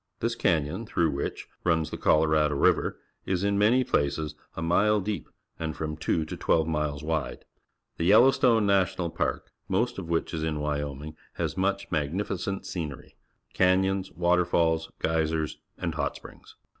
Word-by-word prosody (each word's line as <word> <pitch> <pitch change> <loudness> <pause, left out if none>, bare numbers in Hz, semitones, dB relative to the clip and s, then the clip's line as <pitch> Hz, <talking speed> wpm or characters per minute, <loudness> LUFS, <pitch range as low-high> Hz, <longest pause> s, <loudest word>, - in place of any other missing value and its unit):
This 115 +1 -1
canj'on, 85 +4 0
through 85 -5 +1
which 70 0 -4 0.2
runs 80 -2 +1
the - - -4
Colorado 75 -1 +3
River, 70 - +2 0.3
is 95 0 0
in 100 0 +1
many 120 +5 +4
places 75 - 0 0.2
a - - -3
mile 105 +6 +3
deep 100 +1 -4 0.3
and 80 -1 -3
from 75 -1 -3
two 80 +1 0
to - - -6
twelve 80 -1 +1
miles 75 -2 -2
wide. 80 -2 -3 0.5
The 85 - -1
Yellowstone 115 +2 +5
National 95 -3 +1
Park, - - -2 0.2
most 115 +4 0
of 85 -3 -7
which 85 +1 -1
is 80 -1 -2
in 80 -1 -1
Wyo 75 -2 -2
ming, 75 +2 -8 0.2
has - - -3
much 100 +1 -1
magnificent 90 +5 -2
scenery 75 -6 -6 0.2
— - - -41
can 95 +1 +4
3^ons, 95 0 -1
waterfalls, 85 -2 +2
geysers, 80 -1 -1 0.2
and 85 -3 -3
hot 75 -3 -2
springs. - - -13
85 Hz, 160 wpm, -27 LUFS, 75-95 Hz, 0.5 s, Yellowstone